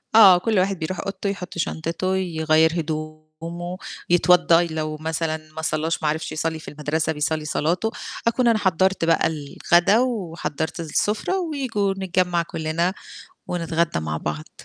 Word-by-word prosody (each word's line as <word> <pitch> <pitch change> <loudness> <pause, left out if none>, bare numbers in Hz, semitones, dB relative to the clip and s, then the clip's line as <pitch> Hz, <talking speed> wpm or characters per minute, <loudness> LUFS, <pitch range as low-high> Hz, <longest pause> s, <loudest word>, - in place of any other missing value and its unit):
آه، 200 -5 +9
كلّ 215 +2 +1
واحد 190 0 0
بيروح 170 +3 -3
أوضته 195 +1 -3
يحط 190 -3 -6
شنطته 170 +3 -1
يغيّر 160 -3 +2
هدومه، 155 +3 -6 0.3
يتوضّى 175 -1 +5
لو 155 -1 -3
مثلًا 160 0 -2 0.2
ما 160 - -4
صلّاش 160 0 -1
ما 150 - +2
عرِفش 155 +1 -2
يصلّي 160 +1 -2
في - - -13
المدرسة 155 +2 -1
بيصلّي 150 +1 -1
صلاته، 170 +8 0 0.4
أكون 240 +1 +2
أنا 230 -2 +4
حضّرت 190 -1 +2
بقى 165 0 +3
الغدا 170 +6 +2
وحضّرت 175 - -2
السُفرة، 210 - 0
وييجوا 260 - -1
نتجمّع 180 -2 +1
كلّنا 165 +2 -1 0.5
ونتغدى 170 - 0
مع 75 -1 -3
بعض. 75 0 -5
165 Hz, 140 wpm, -23 LUFS, 155-190 Hz, 0.5 s, آه